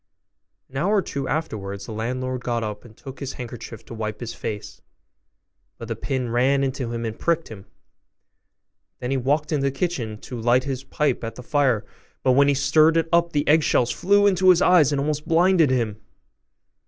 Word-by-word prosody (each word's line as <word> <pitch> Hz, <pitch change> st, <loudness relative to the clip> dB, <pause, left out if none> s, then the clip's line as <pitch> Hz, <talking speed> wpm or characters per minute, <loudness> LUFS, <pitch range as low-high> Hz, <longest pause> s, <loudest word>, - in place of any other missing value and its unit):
An 135 Hz, -, -9 dB
hour 195 Hz, +9 st, +1 dB
or 200 Hz, -, +3 dB
two 140 Hz, -1 st, -4 dB
afterwards 100 Hz, -11 st, -4 dB
the -, -, -8 dB
landlord 125 Hz, +3 st, -3 dB
got 120 Hz, -1 st, -1 dB
up, 105 Hz, -1 st, -5 dB
and 115 Hz, -2 st, -16 dB
took 135 Hz, -1 st, -10 dB
his 140 Hz, -2 st, -5 dB
handkerchief 115 Hz, -3 st, -8 dB
to -, -, -10 dB
wipe 110 Hz, -1 st, -4 dB
his 115 Hz, -1 st, -5 dB
face, 105 Hz, -3 st, -6 dB, 1.0 s
but 115 Hz, -, -8 dB
the 115 Hz, -, -3 dB
pin 130 Hz, -2 st, -3 dB
ran 135 Hz, +3 st, +2 dB
into 130 Hz, -3 st, -2 dB
him 115 Hz, 0 st, -3 dB
and 110 Hz, -1 st, -5 dB
pricked 165 Hz, -1 st, 0 dB
him: 100 Hz, -2 st, -11 dB, 1.3 s
then 125 Hz, +1 st, -4 dB
he 135 Hz, -, +1 dB
walked 145 Hz, +5 st, 0 dB
into 150 Hz, -3 st, +1 dB
the -, -, 0 dB
kitchen 130 Hz, -9 st, -3 dB
to 125 Hz, -3 st, -7 dB
light 120 Hz, +2 st, +3 dB
his 135 Hz, -1 st, -4 dB
pipe 135 Hz, -1 st, -1 dB
at 115 Hz, 0 st, -5 dB
the 125 Hz, -, -10 dB
fire, 130 Hz, -6 st, +1 dB, 0.4 s
but 130 Hz, -, +4 dB
when 140 Hz, +2 st, +5 dB
he 140 Hz, -, +3 dB
stirred 155 Hz, +4 st, +4 dB
it 165 Hz, 0 st, 0 dB
up 170 Hz, 0 st, +3 dB
the 145 Hz, -1 st, -1 dB
eggshells 150 Hz, -5 st, +3 dB
flew 205 Hz, +2 st, +3 dB
into 190 Hz, -2 st, +4 dB
his 180 Hz, -2 st, +6 dB
eyes, 170 Hz, -7 st, +5 dB
and 140 Hz, -, 0 dB
almost 150 Hz, +2 st, -2 dB
blinded 170 Hz, -2 st, +4 dB
him. 115 Hz, -5 st, -1 dB
130 Hz, 195 wpm, -23 LUFS, 115-155 Hz, 1.3 s, his